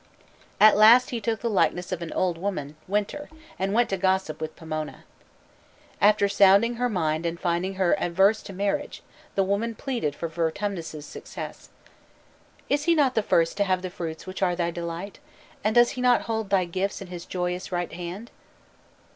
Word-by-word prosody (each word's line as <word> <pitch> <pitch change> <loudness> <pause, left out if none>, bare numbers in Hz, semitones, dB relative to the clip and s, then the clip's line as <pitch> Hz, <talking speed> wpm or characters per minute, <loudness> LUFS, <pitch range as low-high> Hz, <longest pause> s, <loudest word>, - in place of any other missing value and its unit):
At 215 0 +8
last 235 +6 +7
he 235 -2 -3
took 225 +1 -2
the 235 - -1
likeness 180 -4 +1
of 180 -2 -3
an 170 - -5
old 180 -2 0
woman 170 -7 -4
(winter), 210 +9 -2 0.3
and 190 +1 0
went 235 +3 +3
to 195 - 0
gossip 190 -4 0
with 155 0 -5
Pomona. 155 -1 -6 1.0
After 205 0 +5
sounding 200 +4 +4
her 245 +1 0
mind 160 -6 -1
and 170 0 -3
finding 180 +2 -1
her 185 -2 +2
averse 195 +3 +2
to - - -9
marriage, 200 +9 -2 0.3
the 195 - +3
woman 205 +4 -1
pleaded 235 - -3
for 170 - -4
Vertumnus's 165 -1 -3
success. - - -9 1.0
"Is 290 +3 0
not 300 -6 +4
he - - -24
the 220 - +2
first 165 +3 +2
to 205 - +3
have 185 -2 0
the 185 - -4
fruits 160 -2 -6
which 185 0 -7
are 180 -2 +2
thy 170 -1 -1
delight? 170 +3 -6 0.4
And 215 +2 +1
does 240 0 +6
he 250 - -5
not 250 -1 +4
hold 220 -3 -3
thy 190 -2 +3
gifts 185 +3 -2
in 195 - -7
his 175 -1 -8
joyous 180 0 -3
right 175 -2 -2
hand?" 180 +7 -7
190 Hz, 180 wpm, -25 LUFS, 170-215 Hz, 1.0 s, At